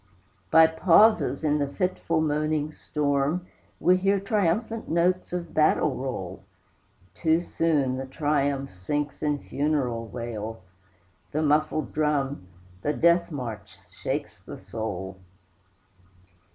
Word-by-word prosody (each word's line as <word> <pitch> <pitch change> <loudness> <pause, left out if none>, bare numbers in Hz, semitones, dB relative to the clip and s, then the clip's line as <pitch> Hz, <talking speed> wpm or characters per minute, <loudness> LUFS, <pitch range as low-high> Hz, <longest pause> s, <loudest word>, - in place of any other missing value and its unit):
By 160 0 +8
pauses, 175 +6 +4
in 150 -1 +2
the 145 - 0
fitful 165 0 -1
moaning 155 0 0
storm, 150 +3 -1 0.3
We 180 +1 +4
hear 195 +2 +2
triumphant 210 +3 -1
notes 175 +3 +1
of 175 -2 -4
battle 155 - +3
roll. 95 -8 -5 0.7
Too 160 0 +2
soon 150 -7 0
the 135 0 -5
triumph 140 -1 0
sinks 145 +11 -3
in 150 -1 +1
funeral 140 -6 -1
wail; 115 -3 -6 0.7
The 155 +2 0
muffled 155 0 +1
drum, 145 -8 0 0.3
the 150 - 0
death 170 +3 +3
march, 110 - -6
shakes - - -4
the - - -9
soul! 95 -2 -5
150 Hz, 110 wpm, -26 LUFS, 130-165 Hz, 0.7 s, By